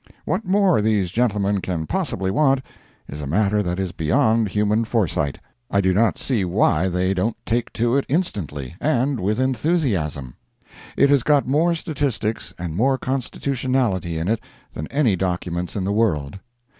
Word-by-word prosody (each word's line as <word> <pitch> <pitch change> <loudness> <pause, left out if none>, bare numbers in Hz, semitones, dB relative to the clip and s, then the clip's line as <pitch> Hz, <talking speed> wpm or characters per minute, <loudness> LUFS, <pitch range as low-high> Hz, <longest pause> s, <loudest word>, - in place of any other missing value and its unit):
What - - -1
more 190 - +3
these 105 -4 +1
gentlemen 105 -4 +1
can 85 -4 -3
possibly 95 +4 -1
want, 135 +2 +2 0.4
is 75 +2 -7
a 70 - -5
matter 105 +6 +2
that 90 -2 -2
is 95 -2 -2
beyond 110 - +2
human 105 +2 +1
foresight. 90 - -1 0.3
I 100 - +2
do 95 -1 +2
not 110 +4 +2
see 120 -7 0
why 90 -1 +2
they 90 +2 0
don't 100 +5 -1
take 120 +1 -1
to 120 +2 +1
it 140 - +1
instantly, 85 - -2
and 140 -3 +1
with 105 +5 0
enthusiasm. 120 - 0 0.6
It 140 - +5
has 140 -2 +5
got 145 0 +2
more 160 +6 +2
statistics 130 - -2
and 85 -2 -5
more 130 +7 +2
constitutionality 130 -8 -1
in 80 +2 -2
it 110 +1 +1 0.3
than 75 - -5
any 135 -8 +2
document 90 -1 -2
in 100 - -1
the 100 +2 -1
world. 95 -7 0
105 Hz, 160 wpm, -22 LUFS, 90-130 Hz, 0.6 s, It